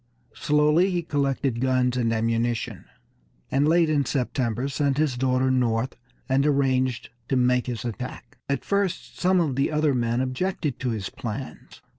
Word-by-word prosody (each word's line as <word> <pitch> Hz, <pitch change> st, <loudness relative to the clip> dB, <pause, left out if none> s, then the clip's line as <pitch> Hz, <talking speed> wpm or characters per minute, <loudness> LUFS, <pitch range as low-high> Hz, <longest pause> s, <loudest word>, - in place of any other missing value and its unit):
Slowly 150 Hz, +5 st, +3 dB
he 175 Hz, -2 st, -1 dB
collected 135 Hz, -5 st, -1 dB
guns 130 Hz, -1 st, +2 dB
and 120 Hz, -2 st, +1 dB
ammunition, 115 Hz, +1 st, -1 dB, 0.7 s
and 140 Hz, +2 st, +2 dB
late 165 Hz, +1 st, +4 dB
in 150 Hz, -2 st, +2 dB
September 125 Hz, -2 st, -1 dB
sent 140 Hz, 0 st, 0 dB
his 150 Hz, -4 st, +1 dB
daughter 130 Hz, +1 st, +1 dB
north, 125 Hz, -1 st, 0 dB, 0.3 s
and 135 Hz, +1 st, +2 dB
arranged 130 Hz, -4 st, +1 dB, 0.2 s
to 135 Hz, -, +1 dB
make 125 Hz, 0 st, +2 dB
his 120 Hz, -2 st, -4 dB
attack. 120 Hz, +2 st, -7 dB
At 140 Hz, -1 st, -1 dB
first 200 Hz, -3 st, -1 dB
some 185 Hz, 0 st, +3 dB
of 150 Hz, -7 st, 0 dB
the 135 Hz, -, +1 dB
other 150 Hz, -1 st, +2 dB
men 120 Hz, -1 st, 0 dB
objected 140 Hz, +2 st, -2 dB
to 130 Hz, -, -1 dB
his 105 Hz, -5 st, -3 dB
plans. 120 Hz, +3 st, -7 dB
130 Hz, 155 wpm, -25 LUFS, 125-150 Hz, 0.7 s, late